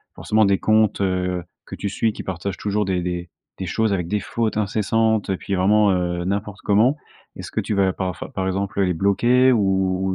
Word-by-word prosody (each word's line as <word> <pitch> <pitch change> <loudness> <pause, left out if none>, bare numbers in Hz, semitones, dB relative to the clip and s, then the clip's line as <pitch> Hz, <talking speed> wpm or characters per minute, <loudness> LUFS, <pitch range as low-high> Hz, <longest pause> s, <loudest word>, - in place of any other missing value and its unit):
forcément 110 0 +2
des 100 -1 +2
comptes, 110 -1 +2
heu, 90 -2 -1 0.2
que - - -8
tu 100 - -3
suis 110 +2 0
qui - - -7
partagent 95 +1 -4
toujours 105 0 -1
des 95 -2 -1
des 90 -1 -4 0.3
des 95 - -4
choses 110 +3 0
avec 90 -3 -2
des 105 +4 0
fautes 110 0 -2
incessantes 110 +1 +1
et 95 - 0
puis 100 - -3
vraiment, 105 +3 +4
heu, 90 -1 -1
n'importe 100 +1 -3
comment. 110 +7 +3 0.4
Est-ce - - -8
que - - -2
tu - - -2
vas 95 -1 +2
parfois 90 -2 -5
par 95 -1 -2
exemple 100 +1 -1
les 90 -2 +2
bloquer 120 +8 +3
ou 120 - +3 0.5
ou 95 - 0
100 Hz, 205 wpm, -22 LUFS, 95-105 Hz, 0.5 s, vraiment